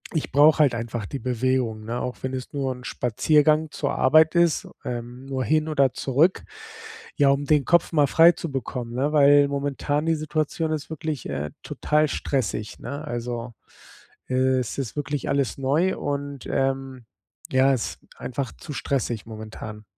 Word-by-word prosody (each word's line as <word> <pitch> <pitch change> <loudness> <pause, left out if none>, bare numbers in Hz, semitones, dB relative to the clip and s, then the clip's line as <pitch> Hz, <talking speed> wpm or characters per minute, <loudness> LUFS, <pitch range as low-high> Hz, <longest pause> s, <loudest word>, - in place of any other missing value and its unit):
Ich 155 - -2
brauche 150 +2 +6
halt 145 -5 +5
einfach 115 -1 -4
die 140 - -5
Bewegung, 125 -3 -1
ne, 120 +2 -3
auch 125 - -4
wenn 130 0 -3
es 130 -1 -5
nur 135 -2 -2
'n 125 0 -12
Spaziergang 150 +6 +2
zur - - -2
Arbeit 155 +4 +5
ist, 170 -3 +2 0.2
ähm, 120 +1 -6
nur 130 -2 -2
hin 155 0 +2
oder 140 -4 +2
zurück, 145 +8 +2 0.7
ja, 145 -2 +4
um 140 +1 +1
den 150 -1 +3
Kopf 170 +4 +3
mal 150 -4 +3
frei 165 +4 +7
zu 170 -2 -6
bekommen, 125 -2 -4
ne? 140 +4 0
Weil 145 -1 +6
momentan 145 +2 -2
die 165 - +3
Situation 155 +1 -2
ist 155 -1 -3
wirklich, 155 -3 -4
äh, 75 0 -3
total 150 +1 +1
stressig, 130 -7 -2
ne? 140 +5 -6
Also, 120 -2 -4 0.7
es 130 -1 0
ist 130 -5 -4
wirklich 145 -1 -3
alles 140 -2 0
neu 150 +8 +1
und, 140 -1 -4
ähm, 135 -2 -2 0.5
ja, 135 +1 +4
es 125 - -3 0.2
einfach 130 +1 -4
zu 150 - -8
stressig 120 -6 -2
momentan. 110 -1 -8
135 Hz, 160 wpm, -24 LUFS, 125-150 Hz, 0.7 s, frei